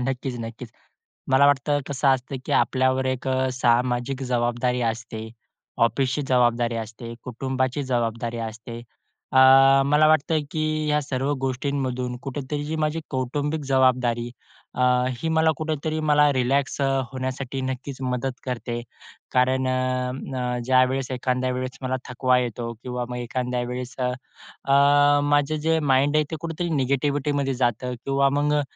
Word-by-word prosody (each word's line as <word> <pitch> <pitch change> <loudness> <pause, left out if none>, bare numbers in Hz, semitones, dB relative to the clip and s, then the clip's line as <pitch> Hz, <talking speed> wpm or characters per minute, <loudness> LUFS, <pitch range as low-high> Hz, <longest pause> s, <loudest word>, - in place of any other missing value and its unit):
नक्कीच, 130 -1 -3
नक्कीच. 115 +1 -7 0.6
मला 135 +2 +6
वाटतं 145 +1 +2
कसं 140 -1 0
असतं, 130 0 +1
की - - -2
आपल्यावर 130 0 +1
एक 130 0 -2 0.2
सामाजिक 125 +1 +1
जबाबदारी 120 +1 0
असते, 110 -1 -7 0.6
ऑफिसची 135 +4 -1
जबाबदारी 120 -2 +2
असते, 115 +2 -9
कुटुंबाची 130 +2 -2
जबाबदारी 115 0 -1
असते. 115 +1 -9 0.5
अ, 130 - +4 0.5
मला 150 +2 +4
वाटतं 155 +1 +2
की 155 - -2 0.3
ह्या 150 0 +2
सर्व 135 0 -1
गोष्टींमधून 130 -2 -2
कुठेतरी 145 +2 -4
जी 155 +2 -3
माझी 155 +1 0
कौटुंबिक 145 +4 -2
जबाबदारी, 125 -3 +2 0.4
अ, 125 - -1 0.4
ही 165 - -2
मला 160 0 +4
कुठेतरी 155 0 -2
मला 150 0 +5
रिलॅक्स 135 +2 0
अ, - - +2 0.3
होण्यासाठी 130 0 -4
नक्कीच 130 +1 -4
मदत 125 0 -2
करते. 120 -2 -4 0.5
कारण 130 +1 +2
अ, - - +1 0.7
अ, 125 0 -1
ज्यावेळेस, 130 +1 +2
एखाद्या 130 0 -1
वेळेस 130 +1 -4
मला 130 0 -1
थकवा 125 0 +2
येतो, 120 -1 -3
किंवा 125 -1 -3
मग 125 - -5
एखाद्या 125 +1 -2
वेळेस 125 +1 -5
अ, 125 -1 0 0.6
अ, 145 +1 +5
माझं 145 +1 +2
जे 160 0 +3
माइंड 140 +3 +3
आहे, 155 - +3
ते 160 - -3
कुठेतरी 170 +1 -3
निगेटिव्हिटीमध्ये 140 +1 0
जातं 125 0 -1
किंवा 140 0 +2
मग 150 0 +1
अ, - - 0
130 Hz, 140 wpm, -24 LUFS, 125-140 Hz, 0.7 s, मला